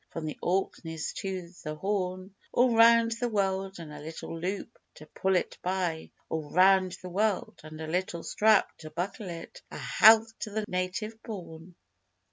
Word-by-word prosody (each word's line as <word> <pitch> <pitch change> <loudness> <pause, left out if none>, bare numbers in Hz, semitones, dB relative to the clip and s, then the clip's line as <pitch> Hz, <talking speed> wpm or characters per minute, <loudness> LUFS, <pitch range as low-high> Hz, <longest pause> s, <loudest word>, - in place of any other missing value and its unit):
From 165 - -5
the 155 - -5
Orkneys 170 -3 -2
to 185 -3 -4
the 155 -2 -4
Horn, 185 +1 -2 0.2
All 245 -1 +4
round 230 0 +6
the 240 +1 -1
world 195 -2 -1
(and 160 -3 -9
a 150 - -8
little 160 +2 -7
loop 190 +4 -4 0.2
to 155 - -12
pull 190 +4 0
it 180 - -1
by), 180 -3 -2 0.2
All 155 -2 -4
round 185 +1 +5
the 180 - -6
world 205 +2 0
(and 155 0 -10
a 160 - -4
little 170 0 -2
strap 215 -1 +3
to 155 - -9
buckle 180 +5 -4
it), 170 - -8
A - - -8
health 225 - +6
to - - -4
the 215 +1 -2
Native 200 +5 -3
born! 170 -4 -9
185 Hz, 170 wpm, -29 LUFS, 165-210 Hz, 0.2 s, round